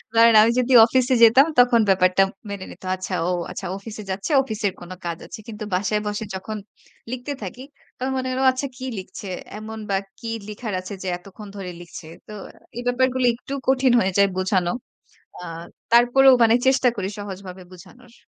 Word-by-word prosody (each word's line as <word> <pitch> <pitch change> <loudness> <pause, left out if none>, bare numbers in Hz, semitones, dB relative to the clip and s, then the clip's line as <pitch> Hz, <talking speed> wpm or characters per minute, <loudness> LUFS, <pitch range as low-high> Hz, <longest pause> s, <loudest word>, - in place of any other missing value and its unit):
কারণ 230 0 +7
আমি 230 +2 +4
যদি 250 +1 +1
অফিসে 255 +2 +1
যেতাম, 255 +6 +7
তখন 245 -1 +5
ব্যাপারটা 185 0 +4 0.3
মেনে 200 -2 -6
নিত। - - -15
"আচ্ছা 185 0 -6
ও, - - 0 0.2
আচ্ছা - - -7
অফিসে 215 +1 -9
যাচ্ছে, 195 - -4
অফিসের 215 -5 -2
কোন 175 +1 -10
কাজ 170 -1 -3
আছে।" 230 - -9
কিন্তু 215 -1 -7
বাসায় 205 +3 0
বসে 210 +1 -3
যখন 215 +3 -5 0.5
লিখতে 255 +3 -4
থাকি, 245 +8 -7 0.3
তখন 260 +1 -2
মনে 260 0 -2
হলো, 260 +1 -1
"আচ্ছা 260 +2 -3
কি 260 - -6
লিখছে 190 +1 -9 0.3
এমন 220 +1 -8
বা 195 - +1 0.2
কী 230 - -6 0.2
লিখার 215 0 -6
আছে 185 +2 -8
যে, - - -5
এতক্ষণ 195 +3 -13
ধরে 185 -2 -6
লিখছে?" 170 -1 -11 0.2
তো 215 - -9 0.4
এই - - -3
ব্যাপারগুলো 255 0 +1
একটু 270 +3 -9
কঠিন 265 -1 +3
হয়ে 190 -2 +1
যায় 200 0 +5
বুঝানো। 185 -2 +1 0.7
আ - - -7 0.5
তারপরেও 255 +3 +6
মানে 225 0 +5
চেষ্টা 265 -1 +4
করি 195 -1 -3
সহজভাবে 190 -2 -8
বুঝানোর। 230 +7 -16
215 Hz, 175 wpm, -22 LUFS, 190-250 Hz, 0.7 s, কারণ